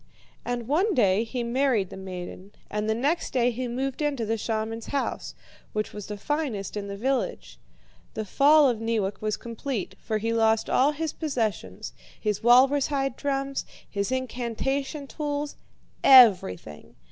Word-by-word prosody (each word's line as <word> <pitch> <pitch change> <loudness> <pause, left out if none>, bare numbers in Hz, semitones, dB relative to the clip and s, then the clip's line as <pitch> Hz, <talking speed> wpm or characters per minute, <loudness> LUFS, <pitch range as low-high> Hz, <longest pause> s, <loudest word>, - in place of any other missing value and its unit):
And 240 -2 -3
one 365 - +2
day 205 -3 +3
he 240 +1 -4
married 235 -5 +1
the - - -7
maiden, 185 +1 -8 0.2
and 210 +1 -1
the 220 - +2
next 290 +9 -1
day 245 -1 +3
he 250 +2 -3
moved 260 +4 -3
into 280 -6 0
the 225 +1 0
shaman's 225 0 -3
house, 280 - -3 0.4
which 215 -1 -2
was 210 -2 -7
the 210 - -5
finest 255 - -3
in 205 -1 -4
the 200 0 -6
village. 265 +4 -2 0.6
The 220 - -3
fall 290 +6 +5
of 240 -4 0
Neewak 220 -3 -1
was 215 -1 -1
complete, 235 -2 -4
for 215 - -2
he 225 +2 -1
lost 225 -1 +2
all 280 +4 +4
his 315 +1 -3
possessions, 220 - -3 0.3
his 210 -2 -1
walrus 260 +4 +5
hide 275 -3 -1
drums, 275 -1 -2 0.2
his 200 +2 -2
incantation 260 +3 -2
tools 290 +1 -4 0.5
everything. 185 - +5
235 Hz, 155 wpm, -26 LUFS, 215-275 Hz, 0.6 s, fall